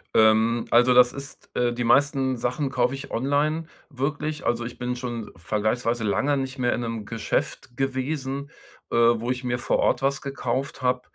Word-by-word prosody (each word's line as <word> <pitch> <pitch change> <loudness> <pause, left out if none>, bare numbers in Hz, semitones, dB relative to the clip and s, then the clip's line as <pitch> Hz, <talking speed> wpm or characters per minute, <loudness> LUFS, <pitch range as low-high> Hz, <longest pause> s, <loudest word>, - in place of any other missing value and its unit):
Ähm, 110 +1 +4
also 120 +1 +6
das 125 0 +7
ist, 140 0 -10
äh 120 -1 +1
die 120 0 -2
meisten 135 0 +3
Sachen 125 +4 -1
kaufe 125 -1 +1
ich 135 - -8
online, 145 +6 0 0.2
wirklich. 150 +2 -3
Also, 120 0 +1
ich 120 - -8
bin 125 0 -2
schon 120 -3 -5
vergleichsweise 110 +5 -1
lange 140 +7 +1
nicht 135 0 -3
mehr 120 -2 +1
in - - -2
'nem 115 -2 -4
Geschäft 115 +2 -3
gewesen, 135 +1 -2 0.4
äh, - - -1
wo 115 0 +3
ich 125 0 -3
mir 120 -1 -1
vor 130 - 0
Ort 125 - +2
was 135 0 0
gekauft 135 0 -3
habe, 125 0 +1
125 Hz, 180 wpm, -25 LUFS, 120-135 Hz, 0.4 s, das